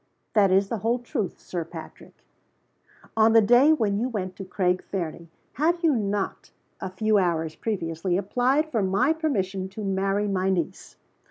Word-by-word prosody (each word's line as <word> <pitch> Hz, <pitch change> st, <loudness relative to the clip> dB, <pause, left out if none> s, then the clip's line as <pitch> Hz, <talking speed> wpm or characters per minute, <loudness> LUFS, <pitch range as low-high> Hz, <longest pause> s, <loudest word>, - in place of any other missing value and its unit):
"That 205 Hz, -3 st, +5 dB
is 195 Hz, +1 st, +3 dB
the 230 Hz, -, -2 dB
whole 230 Hz, +5 st, +1 dB
truth, 230 Hz, -5 st, -4 dB
Sir 175 Hz, -2 st, -4 dB
Patrick." 165 Hz, 0 st, -12 dB, 0.9 s
"On 220 Hz, 0 st, +5 dB
the 225 Hz, -, +8 dB
day 245 Hz, +8 st, +6 dB
when 210 Hz, -9 st, +1 dB
you 245 Hz, +3 st, -1 dB
went 185 Hz, -6 st, -4 dB
to 195 Hz, -, -6 dB
Craig 185 Hz, -1 st, 0 dB
Fernie, 170 Hz, -3 st, -5 dB, 0.2 s
had 335 Hz, +4 st, +1 dB
you 315 Hz, -4 st, +4 dB
not, 205 Hz, -3 st, -2 dB, 0.3 s
a 190 Hz, -, -4 dB
few 210 Hz, +3 st, +2 dB
hours 165 Hz, -3 st, 0 dB
previously, 175 Hz, -4 st, -2 dB
applied 255 Hz, +10 st, +1 dB
for 225 Hz, -, +1 dB
my 200 Hz, +10 st, +2 dB
permission 195 Hz, -, -2 dB
to 210 Hz, +3 st, -7 dB
marry 195 Hz, +1 st, 0 dB
my 190 Hz, -1 st, 0 dB
niece?" 180 Hz, -4 st, -3 dB
200 Hz, 165 wpm, -25 LUFS, 185-230 Hz, 0.9 s, the